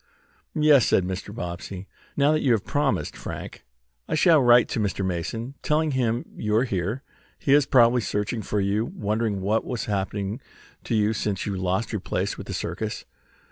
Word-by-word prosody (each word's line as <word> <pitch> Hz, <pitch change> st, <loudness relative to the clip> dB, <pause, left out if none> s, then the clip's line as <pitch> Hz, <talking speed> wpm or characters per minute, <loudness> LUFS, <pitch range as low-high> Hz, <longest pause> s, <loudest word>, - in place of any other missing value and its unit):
"Yes," 150 Hz, -4 st, +5 dB
said 95 Hz, -, +3 dB
Mr. 95 Hz, +2 st, -5 dB
Bobbsey. 95 Hz, -1 st, -6 dB, 0.3 s
"Now 145 Hz, +1 st, +4 dB
that 155 Hz, -, +1 dB
you 125 Hz, -, +3 dB
have 110 Hz, -, -1 dB
promised, 145 Hz, -2 st, 0 dB
Frank, -, -, -7 dB, 0.4 s
I -, -, -1 dB
shall 160 Hz, -1 st, +5 dB
write 120 Hz, -1 st, +6 dB
to -, -, -2 dB
Mr. 100 Hz, -2 st, -1 dB
Mason, 115 Hz, +8 st, -3 dB
telling 155 Hz, 0 st, +1 dB
him 120 Hz, -2 st, 0 dB
you 105 Hz, 0 st, -1 dB
are 115 Hz, -, +4 dB
here. 105 Hz, +3 st, -2 dB, 0.3 s
He 140 Hz, -, +1 dB
is 145 Hz, -1 st, +5 dB
probably 120 Hz, -1 st, +5 dB
searching 105 Hz, +2 st, -2 dB
for 105 Hz, +1 st, -2 dB
you, 100 Hz, +2 st, +1 dB
wondering 110 Hz, -, -2 dB
what 105 Hz, +4 st, +1 dB
has 120 Hz, -3 st, -4 dB
happened 100 Hz, +1 st, -2 dB, 0.4 s
to -, -, -1 dB
you 105 Hz, 0 st, +2 dB
since 105 Hz, -3 st, -2 dB
you 100 Hz, -, -2 dB
lost 95 Hz, +5 st, -1 dB
your 105 Hz, -, -2 dB
place -, -, -2 dB
with -, -, -9 dB
the -, -, -4 dB
circus." -, -, -4 dB
110 Hz, 180 wpm, -25 LUFS, 100-130 Hz, 0.4 s, write